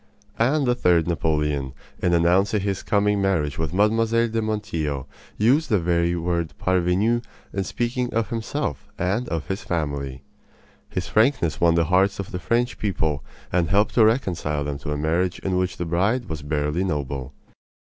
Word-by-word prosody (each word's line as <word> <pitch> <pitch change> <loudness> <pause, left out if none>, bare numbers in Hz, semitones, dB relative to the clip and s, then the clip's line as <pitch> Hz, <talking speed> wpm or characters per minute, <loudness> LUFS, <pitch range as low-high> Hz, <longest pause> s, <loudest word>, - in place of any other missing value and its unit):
And 135 +5 +3
the 125 - +3
third 90 -8 +3
Napoleon, 75 -4 0 0.3
in 85 -1 +3
announcing 95 +5 +3
his 100 -1 -2
coming 105 0 +1
marriage 80 -8 0
with 80 -2 -1
Mlle. 105 +4 +3
de 115 0 +1
Montijo, 85 -11 -2 0.3
used 135 +9 +3
the 105 - +4
very 85 0 +1
word 85 -1 -2
"parvenu" 95 +6 +2 0.3
in 100 - -1
speaking 120 +5 -2
of 115 -2 -1
himself 115 - -3
and 100 +8 -1
of 80 -2 -2
his 95 +3 -3
family. 70 -6 -3 0.7
His 90 - -3
frankness 110 - +2
won 85 -1 +5
the 85 - +3
hearts 95 +4 +3
of 100 - -5
the 90 - -3
French 120 +6 0
people 80 -8 -1 0.3
and 85 -3 +2
helped 100 +4 +2
to 115 - +5
reconcile 90 - +1
them 70 -1 -4
to 75 0 -5
a 75 - -1
marriage 85 +4 0
in 95 -1 -2
which 90 0 -1
the 85 - -3
bride 95 +9 +1
was 80 -3 -5
barely 75 +3 -1
noble. 70 -5 -3
90 Hz, 170 wpm, -23 LUFS, 80-110 Hz, 0.7 s, won